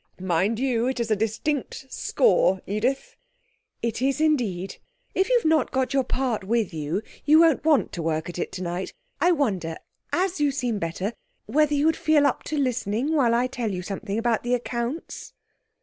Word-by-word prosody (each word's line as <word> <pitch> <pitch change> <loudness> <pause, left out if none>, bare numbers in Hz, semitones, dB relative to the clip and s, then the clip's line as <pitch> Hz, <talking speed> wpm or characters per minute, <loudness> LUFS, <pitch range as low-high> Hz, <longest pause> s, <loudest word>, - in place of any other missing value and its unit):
Mind 185 +4 +1
you, 245 -2 +1
it's 240 -4 -1
a - - +5
distinct 225 +7 -2
score, 190 - +3
Edith!' 240 +7 -2 0.7
'It 230 0 -2
is, 270 +2 +1
indeed. 235 - 0 0.4
If 380 - +1
you - - +5
have 470 - -3
not 315 0 +3
got 260 0 -1
your 270 -1 +3
part 250 -5 -1
with 220 -2 0
you, 160 +6 -2 0.2
you 305 +2 +6
won't 325 -4 +4
want 305 -3 +3
to 170 - -5
work 160 0 -1
at 175 0 -6
it - - -3
tonight. 180 0 -4 0.3
I 355 - +4
wonder, 195 - 0 0.3
as 370 -1 0
you 290 - +4
seem 250 -6 -2
better, 180 +6 -3 0.3
whether 300 0 +2
you 290 +1 +2
would 320 0 +4
feel 310 -3 +3
up - - +1
to 305 - -3
listening 250 +1 0
while 245 -7 +3
I 245 +1 +2
tell 250 -3 -3
you 180 -2 -4
something 200 +2 -4
about 230 -1 +1
the 245 +1 +1
accounts?' 240 +4 -4
240 Hz, 180 wpm, -25 LUFS, 200-290 Hz, 0.7 s, you